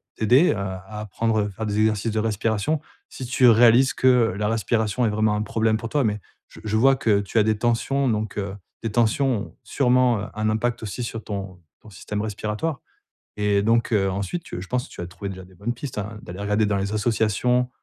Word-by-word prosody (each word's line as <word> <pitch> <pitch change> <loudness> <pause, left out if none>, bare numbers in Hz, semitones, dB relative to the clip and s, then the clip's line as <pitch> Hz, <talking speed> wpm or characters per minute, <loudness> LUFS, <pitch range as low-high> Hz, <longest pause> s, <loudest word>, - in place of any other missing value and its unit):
t'aider 125 +10 +4
à 100 -3 -4
à 105 -1 -7
apprendre 110 +2 -1
à - - -5
faire 110 +3 -6
des 105 -1 -2
exercices 110 0 +1
de 110 - -1
respiration. 110 +6 0 0.3
Si 130 - -7
tu 125 0 +3
réalises 120 +3 +6
que 125 -5 +3
la 105 - 0
respiration 110 +2 0
est - - +2
vraiment 105 0 +1
un 105 - -1
problème 110 +1 +1
pour 115 +1 -6
toi, 145 +1 +1
mais 105 -1 -1 0.3
je - - -15
je 110 0 0
vois 135 +4 +5
que 110 -5 +2
tu 100 +3 -4
as 105 - +5
des 110 0 +1
tensions, 120 +4 0
donc 110 -2 -2
heu, 100 -1 -3 0.3
des 115 - -2
tensions 120 +4 +2 0.2
ont - - -20
sûrement, 125 -3 +2
heu, - - -4
un 110 0 0
impact 115 +2 -1
aussi 110 +3 -4
sur 115 -1 -5
ton 95 -3 -6 0.2
ton 110 - -15
système 105 +1 -5
respiratoire 110 +8 -3 0.6
et 105 -1 +2
donc 115 +1 +2
heu, 95 -2 +2
ensuite 100 - -3
tu 90 - -7
je 95 - -9
pense 125 0 -2
que - - -15
tu - - -7
as 85 - -5
trouvé 90 +3 -7
déjà 95 -1 -8
des 95 - -19
bonnes 115 +7 -3
pistes, 125 0 -7
hein, 105 +1 -6
d'aller 90 +2 -8
regarder 105 +1 +1
dans 100 - 0
les 100 +1 -2
associations, 115 +3 +1
110 Hz, 225 wpm, -23 LUFS, 105-120 Hz, 0.6 s, réalises